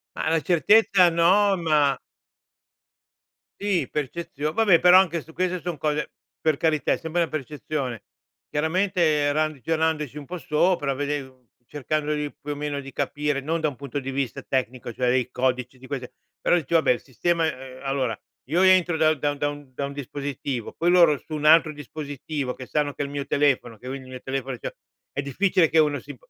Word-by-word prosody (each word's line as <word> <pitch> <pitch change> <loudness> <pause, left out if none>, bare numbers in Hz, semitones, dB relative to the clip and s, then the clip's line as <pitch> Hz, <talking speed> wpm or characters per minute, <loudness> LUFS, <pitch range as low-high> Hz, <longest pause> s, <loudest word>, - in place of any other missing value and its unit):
Ma - - -1
la 165 0 +3
certezza 185 +2 +5
no, 190 +4 +4
ma 150 -4 +2 1.6
Sì, 200 -3 0
percezio 150 0 -3
vabbè, 190 -2 +4
però 180 +1 +8
anche 170 -4 +1
su 160 - -15
queste 185 +1 -1
son 175 -1 -4
cose 150 0 -1 0.3
per 155 -2 +2
carità, 155 -2 +1
è - - +2
sempre 165 +1 -2
una 165 - 0
percezione. 140 -5 -4 0.5
Chiaramente 160 -2 +1
ragionandoci 155 0 -1
un 145 - -7
po' 180 +5 -6
sopra, 150 -1 +1
vedendo 135 -3 -4 0.2
cercando 150 +3 -2
di 150 -1 -2
più 150 - -7
o 145 - -3
meno 145 -1 -3
di 135 0 -10
capire 145 +2 -1
non 160 +4 -2
da 155 - +2
un 130 - -11
punto 140 0 -4
di 135 0 -5
vista 135 -3 -3
tecnico, 125 -2 -2
cioè 125 +2 -1
dei 125 0 +1
codici, 125 0 -1
di 130 - -13
queste 130 -3 -5 0.3
però - - +3
dici: 165 -1 -4
“Vabbè, 160 -6 +4
il 125 - 0
sistema” 165 +6 0 0.4
allora 135 -5 -1 0.3
io 170 +5 +2
entro 185 -3 +5
da 155 0 +4
da 145 0 -1
da 145 +1 -1
un 145 -2 -7
da 140 - -3
un 140 - -6
dispositivo, 140 -3 -5
poi 175 +2 +1
loro 170 -5 +6
su 155 - -11
un 150 0 -3
altro 160 0 +6
dispositivo 145 -2 -5
che 130 - -8
sanno 145 +1 -1
che 145 - -3
è - - -2
il 140 - -7
mio 140 -1 -3
telefono, 135 -6 +1
che 125 - -12
ogni 130 0 -6
mio 130 -1 -7
telefono 135 -1 -4
c'ha - - -5 0.4
è 140 - -1
difficile 165 +4 +2
che 160 - +3
uno 150 -2 +2
si - - -10
150 Hz, 190 wpm, -24 LUFS, 135-165 Hz, 1.6 s, però